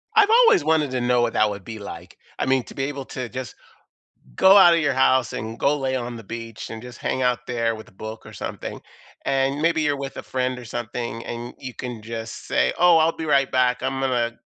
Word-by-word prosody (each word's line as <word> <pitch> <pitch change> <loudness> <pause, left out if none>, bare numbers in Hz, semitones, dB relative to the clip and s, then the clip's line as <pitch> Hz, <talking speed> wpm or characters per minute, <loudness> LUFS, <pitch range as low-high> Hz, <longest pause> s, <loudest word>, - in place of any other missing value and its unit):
I've 430 -2 +6
always 460 -3 +6
wanted 155 -4 +2
to 130 -1 -1
know 120 0 +2
what 120 -1 0
that 110 - +3
would 100 -1 -6
be 110 +1 -8
like, 90 -4 -9 0.2
I - - -1
mean, 130 -1 +2
to - - -12
be 135 - -2
able 140 -1 -5
to 125 -2 -6
just 130 0 -6 0.8
go 195 +1 +7
out 175 -3 +8
of 170 - +3
your 145 -3 +1
house, 130 -2 +3
and 110 +1 -5
go 145 +1 +2
lay 135 -2 -1
on 120 -1 -4
the 115 - -10
beach, 115 +1 -7
and 110 - -7
just 125 0 -11
hang 130 - -1
out 125 -1 +1
there 115 -1 0
with 110 - -11
a - - -23
book 110 +3 -8
or - - -11
something - - -6 0.4
and 135 +1 0
maybe 165 -1 +2
you're 145 -1 +1
with 135 0 -6
a - - -6
friend 130 0 -2
or 125 - -9
something, 120 0 -5
and 120 +1 -6
you 130 -2 -8
can 120 -3 -6
just 115 0 -7
say, 65 +1 +2
"Oh, 175 -1 +6
I'll 160 +1 +3
be 160 - -5
right 140 -2 +3
back. 125 -1 +2
I'm 135 0 -1
gonna 120 -3 0
125 Hz, 240 wpm, -23 LUFS, 115-140 Hz, 0.8 s, out